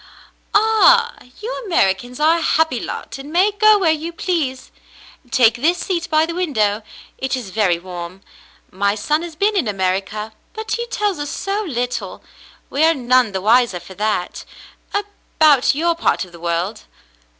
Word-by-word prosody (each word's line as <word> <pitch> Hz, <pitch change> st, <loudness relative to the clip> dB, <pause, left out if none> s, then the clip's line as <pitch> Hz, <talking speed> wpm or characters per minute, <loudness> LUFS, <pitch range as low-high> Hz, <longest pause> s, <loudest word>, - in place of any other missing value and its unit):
"Ah, 445 Hz, +2 st, +5 dB, 0.3 s
you -, -, -5 dB
Americans 245 Hz, -, 0 dB
are 320 Hz, +3 st, +4 dB
a -, -, -5 dB
happy 320 Hz, -6 st, +1 dB
lot -, -, -6 dB
and 280 Hz, +2 st, -9 dB
may 370 Hz, +5 st, +3 dB
go 430 Hz, +1 st, +5 dB
where 360 Hz, -5 st, +2 dB
you 315 Hz, +2 st, -3 dB
please. 320 Hz, -7 st, -3 dB, 0.6 s
Take 230 Hz, -1 st, +4 dB
this 330 Hz, +8 st, +2 dB
seat 345 Hz, -2 st, -3 dB
by 310 Hz, 0 st, +3 dB
the 335 Hz, -, -5 dB
window; 225 Hz, -, 0 dB, 0.4 s
it 265 Hz, 0 st, -1 dB
is 220 Hz, -7 st, -7 dB
very 190 Hz, -4 st, +2 dB
warm. 180 Hz, +1 st, -8 dB, 0.5 s
My 200 Hz, +2 st, 0 dB
son 300 Hz, +9 st, 0 dB
has 340 Hz, -2 st, -7 dB
been 410 Hz, +6 st, +1 dB
in 360 Hz, -, +1 dB
America, 195 Hz, +2 st, -2 dB, 0.2 s
but 440 Hz, 0 st, -6 dB
he 475 Hz, 0 st, -1 dB
tells 415 Hz, -7 st, -1 dB
us 290 Hz, 0 st, -4 dB
so 400 Hz, +5 st, -2 dB
little, 245 Hz, -5 st, -4 dB, 0.5 s
we 290 Hz, -, +1 dB
are 325 Hz, +1 st, +4 dB
none 255 Hz, -3 st, +2 dB
the 190 Hz, -1 st, -3 dB
wiser 225 Hz, -2 st, +3 dB
for 175 Hz, +2 st, -12 dB
that, 210 Hz, -2 st, -2 dB, 0.5 s
about 315 Hz, -10 st, +2 dB
your 340 Hz, +3 st, +1 dB
part 335 Hz, -, 0 dB
of 180 Hz, -, -17 dB
the 170 Hz, -, -13 dB
world." 175 Hz, +5 st, -3 dB
280 Hz, 165 wpm, -19 LUFS, 210-350 Hz, 0.6 s, Ah